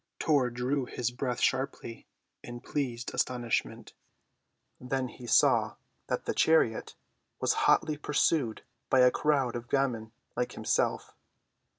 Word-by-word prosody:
Tor 140 -5 +2
drew 125 +3 -1
his 120 -1 -3
breath 125 -1 -3
sharply 130 -3 -2 0.3
in 120 0 -9
pleased 125 -4 -3
astonishment. 120 -4 -2 0.9
Then 130 0 -2
he 120 0 -11
saw - - +3 0.3
that - - -2
the - - -1
chariot 160 -9 +2 0.4
was - - +2 0.2
hotly 155 -1 +3
pursued 145 -5 0 0.3
by 130 - +5
a 125 0 +6
crowd 135 -5 +1
of 120 0 -6
gamins 125 -5 0 0.3
like - - -2
himself. - - -1
125 Hz, 120 wpm, -29 LUFS, 120-140 Hz, 0.9 s, a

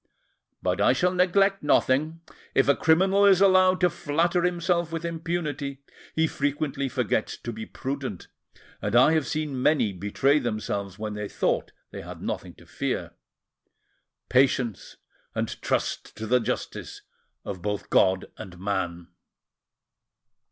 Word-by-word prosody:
But 90 +2 0
I 105 - +5
shall 180 +7 +1
neglect 195 +2 +3
nothing: 150 +3 +2 0.3
if 135 - +4
a 140 - +5
criminal 190 +5 +3
is 195 -2 +6
allowed 185 -1 +5
to 180 - +5
flatter 170 +2 0
himself 170 -1 0
with 165 0 -4
impunity, 155 -5 -3 0.3
he 160 - +3
frequently 145 -2 -2
forgets - - -1
to 120 - -6
be 110 +1 -7
prudent, 135 -8 -5 0.5
and 105 +2 -1
I 130 +5 +7
have 155 -3 +1
seen 150 -4 -2
many 125 -8 +2
betray 105 - +1
themselves 100 -5 -3
when 105 0 -4
they 105 -1 -5
thought - - -1 0.2
they - - -7
had - - -9
nothing - - -5
to - - -17
fear. - - -3 1.2
Patience, 125 -4 +1 0.4
and - - -3
trust - - -2
to 110 - -5
the 125 +3 +3
justice 115 - -4 0.4
of 95 -3 -5
both 105 +1 -4
God 95 -1 +3
and 90 -1 -9
man." 90 -3 -3
140 Hz, 135 wpm, -26 LUFS, 105-170 Hz, 1.2 s, I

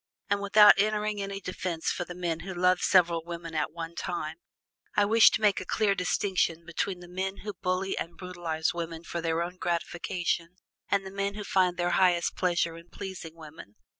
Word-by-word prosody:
And 200 0 +2
without 205 0 +7
entering 210 0 +1
any 195 0 -4
defense 185 -3 -3
for 175 - -3
the 175 - -8
men 170 -2 -2
who 190 +2 -7
love 180 +1 +3
several 170 -3 +4
women 170 -1 -7
at 155 - -1
one 165 0 -6
time, 160 -2 -4 0.6
I 205 - +4
wish 225 +2 +7
to - - -2
make 205 -3 +3
a - - -4
clear 200 +2 +1
distinction 180 -3 0
between 180 +2 -3
the 175 - -11
men 190 +2 -4
who 210 - -3
bully 185 +1 0
and 170 0 -6
brutalize 175 -3 -2
women 165 -1 -5
for 170 0 -4
their 165 0 0
own 180 +1 -6
gratification 175 0 -2 0.3
and 195 -1 +1
the 190 - -7
men 200 +1 -2
who 210 - -5
find 185 -3 +2
their 175 0 0
highest 180 -2 +3
pleasure 175 -2 0
in 170 +1 -14
pleasing 180 -4 -7
women. 155 -10 -12
180 Hz, 195 wpm, -28 LUFS, 170-195 Hz, 0.6 s, without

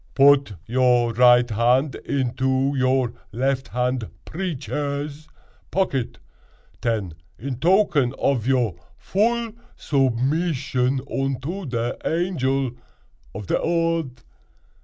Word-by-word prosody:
"Put 140 -4 +5
your 120 0 +2
right 120 +1 +6
hand 125 +5 +2
into 130 +1 0
your 130 -2 +1 0.2
left 135 +3 -1
hand 125 -3 -1 0.2
preeches 150 -3 -4 0.4
pocket, 155 -10 -1 0.6
ten, 105 -7 -1 0.2
in 130 +2 -5
token 155 -7 +3
ov 130 -5 +1
your 125 -8 +2 0.2
vull 230 +3 0 0.3
zubmizzion 135 0 0
unto 140 +7 -3
te 120 0 -1
Angel 135 -7 0 0.6
ov 105 0 -6
te - - +1
Odd." 165 -6 -1
135 Hz, 95 wpm, -23 LUFS, 125-150 Hz, 0.6 s, right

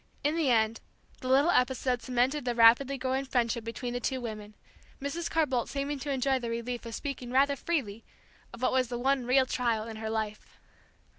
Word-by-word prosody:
In 295 +2 +1
the 320 -5 +1
end 225 -1 +2 0.4
the 255 - -6
little 275 +6 +4
episode 250 -2 +1
cemented 255 +3 0
the 245 -1 -1
rapidly 240 +4 +5
growing 260 +1 -1
friendship 235 -3 0
between 240 +2 -5
the 245 - -2
two 260 +1 -2
women, 215 -3 -7 0.4
Mrs. 285 +5 -3
Carr 325 -1 +2
Boldt 255 -4 -1
seeming 280 0 -3
to 285 - -5
enjoy 270 -1 +1
the 235 -2 -4
relief 235 +1 -4
of 230 - -5
speaking 270 -3 -5
rather 275 +3 +3
freely 250 -10 -2 0.5
of 235 - -10
what - - +3
was 255 -1 +2
the 240 0 -4
one 260 0 +1
real 260 +1 +4
trial 235 -4 0
in 220 -1 -7
her 220 0 -4
life. 215 -1 -4
250 Hz, 200 wpm, -29 LUFS, 230-275 Hz, 0.5 s, rapidly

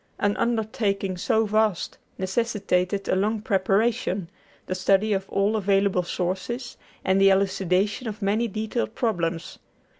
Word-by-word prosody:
An 205 0 +1
undertaking 215 -4 0
so 220 +5 +1
vast 215 -3 0 0.2
necessitated 195 -1 0
a - - +2
long 210 +3 +1
preparation, 200 -2 0 0.3
the - - -3
study 195 +3 +2
of 195 0 -2
all 200 +2 +1
available 195 -2 +2
sources, 190 +8 -3 0.3
and 190 +1 +3
the 195 - +7
elucidation 195 +3 +1
of 215 0 -5
many 215 +3 +1
detailed 220 +1 -3
problems. 175 -9 -2
200 Hz, 125 wpm, -25 LUFS, 190-220 Hz, 0.3 s, the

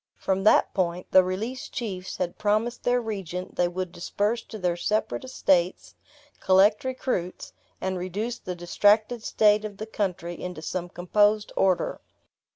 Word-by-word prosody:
From 190 0 -1
that - - +5
point, 180 -1 -1
the 185 - +7
released 215 +8 -4
chiefs 190 -6 -4
had 175 -1 -3
promised 215 +3 0
their 245 0 +2
regent 190 -6 -5
they 175 - +2
would 180 0 -4
disperse 205 +7 -1
to 220 - -8
their 180 -3 0
separate 215 +9 -1
estates, 185 -8 +1 0.5
collect 195 +3 +4
recruits, 255 -9 -3 0.3
and 190 -1 -2
reduce 210 +7 -3
the 180 - -5
distracted 210 +6 +2
state 210 -1 +3
of 205 -2 -6
the 215 - -5
country 180 -5 -3
into 180 -3 -6
some 175 +2 -3
composed 205 +4 +2
order. 185 -2 +1
195 Hz, 150 wpm, -26 LUFS, 180-215 Hz, 0.5 s, the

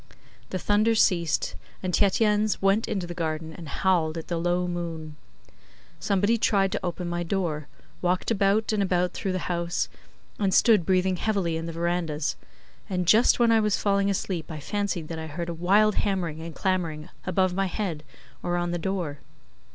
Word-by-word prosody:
The 185 - -2
thunder 210 +4 +2
ceased, 170 -7 +2 0.3
and 185 -1 -2
Tietjens 210 +2 +2
went 195 +3 +2
into 190 -3 -2
the 175 - -6
garden 160 -1 -3
and 165 -3 -9
howled 170 -2 +1
at 165 - -7
the 170 - -1
low 175 +1 +1
moon. 165 -3 -5 0.8
Somebody 205 +4 +2
tried 195 -3 +2
to - - -3
open 175 0 -3
my 175 0 -2
door, 165 -5 -2 0.3
walked 180 +4 0
about 205 +1 +2
and 210 - +1
about 180 -2 +1
through 190 - -2
the 185 - -3
house 170 -1 -1 0.5
and 195 -2 +2
stood 215 -8 +5
breathing 185 0 +2
heavily 190 -5 0
in 165 +1 -3
the - - -4
verandahs, 165 -3 -1 0.5
and 180 -2 -1
just 220 +7 +5
when 235 -1 +4
I 225 - +5
was 210 -2 +2
falling 200 -1 +2
asleep 185 -4 -2
I 155 - -5
fancied 200 -1 -2
that 165 -1 -4
I 160 - -5
heard 170 +3 -5
a - - -2
wild 200 +6 +3
hammering 175 -6 -1
and 165 0 -7
clamouring 170 -5 -1 0.2
above 185 0 +2
my 195 +1 0
head 180 -6 -3 0.4
or 175 0 -1
on 175 0 -1
the 175 - -2
door. 170 -5 -3
180 Hz, 180 wpm, -26 LUFS, 165-200 Hz, 0.8 s, stood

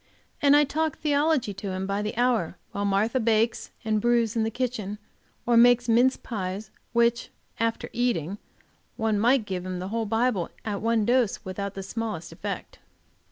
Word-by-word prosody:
And 285 -1 +6
I 295 - +6
talk 310 +2 -1
theology 295 -6 +1
to 195 +1 -7
him 185 +1 -3
by 200 +1 -1
the 210 +1 -4
hour, 240 -8 +1
while 200 0 -2
Martha 205 +6 +1
bakes 225 0 +1 0.2
and 215 -1 +1
brews 235 -1 +2
in 225 - +1
the 220 - +1
kitchen, 225 -4 -3 0.5
or 240 - +3
makes 245 +1 +6
mince 245 +3 +4
pies, 200 -1 -5 0.9
after 230 0 -1
eating 225 -10 0
which 205 - -7 0.6
one 220 -2 +1
might 240 +1 +3
give 185 -3 -3
him 185 0 -4
the 185 +1 -5
whole 225 0 -2
Bible 225 -4 +1 0.2
at 205 -2 -3
one 225 -1 +2
dose, 240 -3 +1
without 200 +1 -4
the 195 - -5
smallest 215 -5 -4
effect. - - -6
225 Hz, 170 wpm, -26 LUFS, 200-245 Hz, 0.9 s, And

